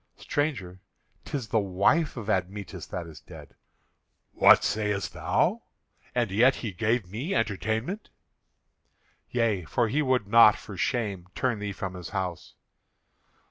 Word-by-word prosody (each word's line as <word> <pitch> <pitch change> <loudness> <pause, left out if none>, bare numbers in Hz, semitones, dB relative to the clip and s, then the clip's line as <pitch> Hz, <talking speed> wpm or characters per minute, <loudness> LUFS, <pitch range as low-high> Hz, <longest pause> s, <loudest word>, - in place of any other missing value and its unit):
"Stranger, 120 - -2 0.5
'tis 130 -6 -4
the 110 - +2
wife 100 - +1
of 110 -3 -6
Admetus 100 0 -3
that 90 - -5
is 80 -2 -11
dead." - - -13 0.8
"What - - +6
sayest 105 -2 -1
thou? - - +1 0.5
And 120 -5 +1
yet 120 +7 +4
he 115 - -5
gave 110 0 -1
me 130 - -3
entertainment?" 110 - -2 1.2
"Yea, 115 -6 0
for 115 +9 0
he 145 +7 +1
would 130 -6 +1
not, 110 -1 +7
for 105 - -10
shame, 100 -3 -2
turn 120 -5 0
thee 105 0 -3
from 95 -1 -5
his 90 -2 -8
house." 95 -4 -4
105 Hz, 135 wpm, -27 LUFS, 95-120 Hz, 1.2 s, not